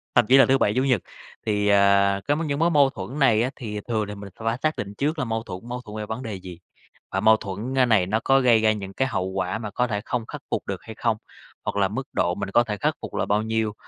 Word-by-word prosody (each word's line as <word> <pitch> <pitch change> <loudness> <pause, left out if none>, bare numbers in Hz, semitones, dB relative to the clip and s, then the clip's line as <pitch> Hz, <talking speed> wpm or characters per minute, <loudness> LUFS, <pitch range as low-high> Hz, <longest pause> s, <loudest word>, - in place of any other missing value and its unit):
thậm 120 - +5
chí 130 - +7
là 135 - +8
thứ 135 - +3
Bảy, 105 - +2
Chủ 130 - +2
nhật. 125 -8 +2 0.4
Thì, 105 -1 +1
à, 100 0 +4
cái 145 - +3
m 160 0 -2
những 140 -1 -1
mối 165 +1 +3
mâu 145 -4 +5
thuẫn 120 +7 -7
này 115 -6 +4
á, 125 - 0
thì 105 -4 -5
thường 110 -3 -1
là 105 - -6
mình 100 0 -9
sẽ - - -9
hỏa 115 +1 +1
xác 155 0 +1
định 100 0 -4
trước 150 +3 -1
là 130 - 0
mâu 115 -1 -2
thuẫn 90 -5 -7
mâu 125 +1 -4
thuẫn 110 -3 -9
về 105 - -4
vấn 110 +4 -5
đề 110 -5 -4
gì? 90 -2 -10 0.5
Và 95 - 0
mâu 110 +2 +5
thuẫn, 105 +6 -5
ơ, 130 - +5
này 110 -6 +3
nó 110 +4 0
có 135 0 +4
gây 120 -4 +4
ra 110 0 +4
những 100 -2 -5
cái 130 - 0
hậu 95 -7 -2
quả 95 +1 -2
mà 105 -2 -6
có 125 +3 0
thể 105 -3 -2
không 120 -3 -2
khắc - - -8
phục - - -2
được - - -4
hay 110 - -9
không? 115 -1 0 0.5
Hoặc - - -2
là 100 -1 +3
mức 125 +8 -5
độ 90 +1 +1
mình 100 -1 -4
có 120 - +5
thể 105 -3 -4
khắc - - +1
phục - - -7
là - - 0
bao 105 +1 +1
nhiêu? 110 -1 -1
110 Hz, 300 wpm, -24 LUFS, 100-125 Hz, 0.5 s, là